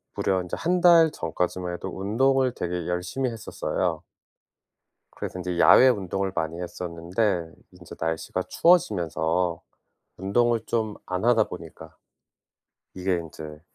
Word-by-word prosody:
무려 95 -1 +1
인제 90 - -5
1 180 +1 0
달 170 -2 +7
전까지만 90 - -3
해도 90 - -5
운동을 130 +6 +1
되게 90 -5 -4
열심히 90 +9 -2
했었어요. 115 -3 -3 1.1
그래서 90 - -6
인제 90 -1 -3
야외 130 +8 +8
운동을 95 -3 -1
많이 80 +2 -2
했었는데 90 +1 -2 0.2
인제 90 -1 -12
날씨가 80 0 -2
추워지면서 90 - +1 0.6
운동을 115 +5 +1
좀 110 -3 -1
안 90 +3 -3
하다 115 -3 +4
보니까 85 -3 -10 1.0
이게 95 0 0
인제 80 -2 -8
90 Hz, 275 characters per minute, -25 LUFS, 85-115 Hz, 1.1 s, 야외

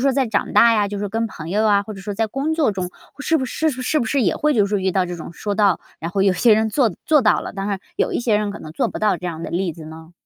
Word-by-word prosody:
说 275 - +4
在 265 -1 +1
长 215 -3 -1
大 235 0 +7
呀， 210 -2 +2
就 205 - -5
是 200 - -4
说 205 - -2
跟 225 +2 -1
朋 165 -6 -8
友 210 +3 +1
呀， 200 -1 +4
或 215 +1 -8
者 195 - -9
说 205 +1 -5
在 225 +2 0
工 275 +8 -2
作 305 -9 +2
中， 185 -2 -4 0.3
是 320 +2 +1
不 260 - -1
是 315 +5 -1
是 260 +3 -1
不 235 - -1
是 275 +1 +1
也 180 -7 +2
会 300 0 +1
就 210 -4 +4
是 200 0 -1
遇 190 - +1
到 185 0 +1
这 180 0 -5
种- 165 -1 -8
说 205 -1 -3
到， 200 -4 +2 0.2
然 165 - -5
后 195 +1 0
有 195 -1 +4
些 220 +4 +4
人 220 +1 +1
做 240 0 +2
做 305 -2 +4
到 215 -4 +3
了， - - -6
当 195 0 -4
然 200 - -1 0.2
有 - - 0
一 - - 0
些 225 -3 +2
人 210 -1 -2
可 205 - -7
能 155 - -10
做 - - 0
不 - - -6
到- 210 -4 +1
这 180 - -5
样 165 -1 -5
的 - - -5
例 175 0 -1
子 160 - -11
呢？ 160 +2 -11
205 Hz, 355 characters per minute, -21 LUFS, 190-235 Hz, 0.3 s, 大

